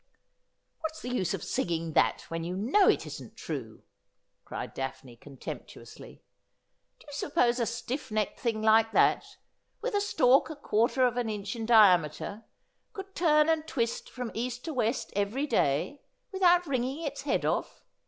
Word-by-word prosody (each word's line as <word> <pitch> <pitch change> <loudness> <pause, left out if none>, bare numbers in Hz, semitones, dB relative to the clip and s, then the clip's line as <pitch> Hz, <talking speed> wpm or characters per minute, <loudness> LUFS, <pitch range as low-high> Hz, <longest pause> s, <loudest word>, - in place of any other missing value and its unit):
' - - -50
What's 320 0 -5
the 250 +1 -4
use 185 -8 0
of - - -8
singing 165 -2 -2
that - - +3
when 165 0 -5
you 175 +2 -4
know 275 - +4
it - - +2
isn't - - -9
true - - -6 0.3
?' - - -50
cried - - -6
Daphne 135 -2 -6
contemptuously. 135 +3 -10 0.4
' - - -49
Do - - -19
you 290 - -12
suppose 255 -4 +1
a 235 - +1
stiff 235 +5 -4
necked 215 -1 -2
thing 225 -3 -1
like 220 0 +4
that, - - +2 0.4
with - - -3
a 410 - +2
stalk 270 -9 +3
a 315 - -6
quarter 255 -1 +2
of 245 0 0
an 240 -2 -1
inch 210 +2 -4
in 225 -1 -4
diameter, 200 -2 +4 0.5
could 390 -2 -8
turn 305 -4 +4
and 320 -1 +1
twist 235 -5 -2
from 250 -2 -6
east 245 +1 -4
to 320 - -4
west 240 -1 -1
every 205 +8 0
day, 225 - 0 0.3
without 355 -2 +4
wring 260 -5 0
ing 270 +6 -4
its 285 -2 -4
head 280 - 0
off - - -2
240 Hz, 175 wpm, -29 LUFS, 215-290 Hz, 0.5 s, know